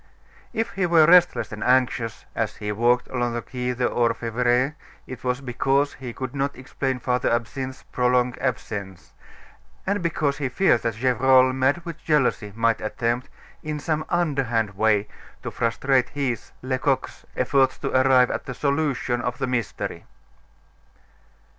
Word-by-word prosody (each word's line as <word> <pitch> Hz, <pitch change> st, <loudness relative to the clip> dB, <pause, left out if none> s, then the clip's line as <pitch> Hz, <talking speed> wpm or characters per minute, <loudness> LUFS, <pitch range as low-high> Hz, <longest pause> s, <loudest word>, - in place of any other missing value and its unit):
If 225 Hz, -1 st, -2 dB
he 190 Hz, -2 st, 0 dB
were 165 Hz, -2 st, +6 dB
restless 170 Hz, -10 st, +5 dB
and 105 Hz, -, -5 dB
anxious 125 Hz, -3 st, +1 dB
as -, -, -2 dB
he 105 Hz, 0 st, -4 dB
walked 120 Hz, +3 st, +2 dB
along 120 Hz, -2 st, -1 dB
the 120 Hz, -, -2 dB
Quai 125 Hz, -1 st, -3 dB
des 125 Hz, 0 st, 0 dB
Orfevres, 120 Hz, +3 st, +1 dB, 0.3 s
it 130 Hz, -, -9 dB
was 125 Hz, +1 st, -1 dB
because 135 Hz, +2 st, +1 dB
he 130 Hz, -2 st, -7 dB
could 130 Hz, +1 st, -6 dB
not 140 Hz, 0 st, -1 dB
explain 130 Hz, 0 st, -3 dB
Father 125 Hz, 0 st, 0 dB
Absinthe's 130 Hz, +3 st, -3 dB
prolonged 125 Hz, 0 st, +2 dB
absence, 105 Hz, -7 st, -4 dB, 0.7 s
and 200 Hz, 0 st, 0 dB
because 150 Hz, -4 st, -1 dB
he 135 Hz, -3 st, -1 dB
feared 190 Hz, +10 st, +3 dB
that 115 Hz, -2 st, -2 dB
Gevrol, 130 Hz, +2 st, +4 dB
mad 135 Hz, +6 st, +1 dB
with 165 Hz, -1 st, -8 dB
jealousy, 135 Hz, -8 st, +1 dB
might 115 Hz, 0 st, +1 dB
attempt, 120 Hz, +3 st, -2 dB, 0.3 s
in 150 Hz, -1 st, -4 dB
some 155 Hz, +1 st, -1 dB
underhand 135 Hz, -, 0 dB
way, 105 Hz, 0 st, +2 dB, 0.4 s
to -, -, -4 dB
frustrate 125 Hz, +3 st, +1 dB
his, 135 Hz, -6 st, -3 dB
Lecoq's, 130 Hz, +1 st, -1 dB
efforts 135 Hz, -2 st, +2 dB
to -, -, -3 dB
arrive 130 Hz, -1 st, +5 dB
at -, -, -5 dB
a 130 Hz, -, -4 dB
solution 140 Hz, -4 st, 0 dB
of 125 Hz, 0 st, -3 dB
the -, -, -1 dB
mystery. 125 Hz, -4 st, -3 dB
130 Hz, 145 wpm, -24 LUFS, 120-140 Hz, 0.7 s, were